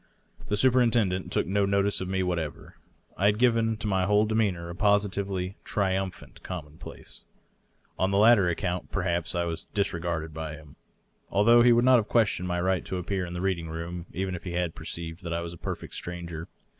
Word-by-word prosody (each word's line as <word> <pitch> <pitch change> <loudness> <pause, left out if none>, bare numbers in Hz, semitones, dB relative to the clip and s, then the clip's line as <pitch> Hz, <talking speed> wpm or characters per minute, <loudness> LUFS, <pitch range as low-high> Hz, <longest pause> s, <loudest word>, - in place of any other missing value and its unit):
The 105 - 0
superintendent 115 -6 +3
took - - +1
no 100 +3 +1
notice 100 0 +1
of 95 - -3
me 95 0 0
what 90 -2 0
ever; 75 -3 -7 0.4
I 100 - +1
had 105 0 +3
given 115 -2 +2
to 110 0 -4
my 95 -2 +1
whole 105 +2 +4
demeanor 105 -6 0
a - - -7
positively 100 -2 0
triumphant 95 -2 -2
com 90 -5 -5
monplace. 75 +1 -11 0.8
On 95 - +2
this 100 - +1
latter 105 -3 +6
account, 90 +1 -2
perhaps, 85 -3 -1
I 85 - +1
was 85 -1 -4
disregarded 85 -5 -1
by 80 -1 -5
him, 75 -1 -15 0.5
although 115 +4 +5
he 120 0 +6
would 120 +1 +4
not 130 -1 +7
have 110 -3 0
questioned 105 -6 +2
my 90 -1 -1
right 95 0 +1
to 95 - -3
appear 90 0 -2
in 85 - -7
the 90 - -4
read 95 -2 0
ing 80 -1 -7
room 85 +2 -6
even 95 +1 -3
if 90 - -6
he 90 - -5
had 85 -2 -1
perceived 80 0 -6
that 85 -2 -4
I 85 - -1
was 85 0 -6
a - - -10
perfect - - -6
stranger. 85 -2 -6
95 Hz, 205 wpm, -27 LUFS, 85-105 Hz, 0.8 s, not